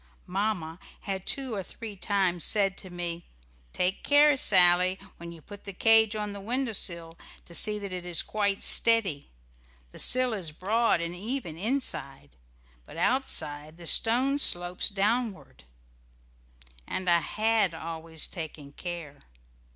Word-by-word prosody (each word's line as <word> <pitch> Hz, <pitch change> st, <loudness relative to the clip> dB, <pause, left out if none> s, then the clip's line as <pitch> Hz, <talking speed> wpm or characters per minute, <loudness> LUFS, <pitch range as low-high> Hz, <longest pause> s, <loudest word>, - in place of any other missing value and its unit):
Mamma 185 Hz, -4 st, -4 dB, 0.2 s
had 195 Hz, -2 st, -6 dB
two 265 Hz, -4 st, -1 dB
or 200 Hz, -, -3 dB
three 210 Hz, +3 st, -10 dB
times 185 Hz, -3 st, -1 dB
said 195 Hz, -2 st, +4 dB
to 185 Hz, -, -10 dB
me, 175 Hz, -1 st, -6 dB, 0.5 s
"Take 180 Hz, +2 st, -2 dB
care, 290 Hz, 0 st, +4 dB
Sally, 180 Hz, -5 st, +4 dB, 0.2 s
when 170 Hz, 0 st, -10 dB
you 165 Hz, -2 st, -14 dB
put 205 Hz, -1 st, -13 dB
the 200 Hz, -, -9 dB
cage 220 Hz, +2 st, +3 dB
on 210 Hz, -1 st, -5 dB
the 200 Hz, -, -9 dB
window 240 Hz, +3 st, -3 dB
sill 170 Hz, -4 st, +1 dB, 0.3 s
to 170 Hz, -, -15 dB
see 210 Hz, +4 st, +4 dB
that 200 Hz, -2 st, -7 dB
it 180 Hz, -1 st, -6 dB
is 175 Hz, -1 st, +1 dB
quite 200 Hz, -2 st, -2 dB
steady. 215 Hz, -11 st, +3 dB, 0.6 s
The -, -, -11 dB
sill 255 Hz, -1 st, +5 dB
is 180 Hz, -7 st, -4 dB
broad 210 Hz, +2 st, 0 dB
and 170 Hz, +1 st, -4 dB
even, 210 Hz, -, -5 dB
inside, 170 Hz, -, -1 dB, 0.5 s
but -, -, -14 dB
outside 155 Hz, -, -1 dB
the 175 Hz, -, -12 dB
stone 255 Hz, -, +3 dB
slopes 175 Hz, -6 st, +2 dB
downward," 200 Hz, -, -3 dB, 1.2 s
and 185 Hz, -, -5 dB
I 170 Hz, -1 st, +3 dB
had 215 Hz, -2 st, 0 dB
always 160 Hz, 0 st, -4 dB
taken 155 Hz, -5 st, -9 dB
care. 165 Hz, -3 st, -8 dB
190 Hz, 145 wpm, -26 LUFS, 170-220 Hz, 1.2 s, sill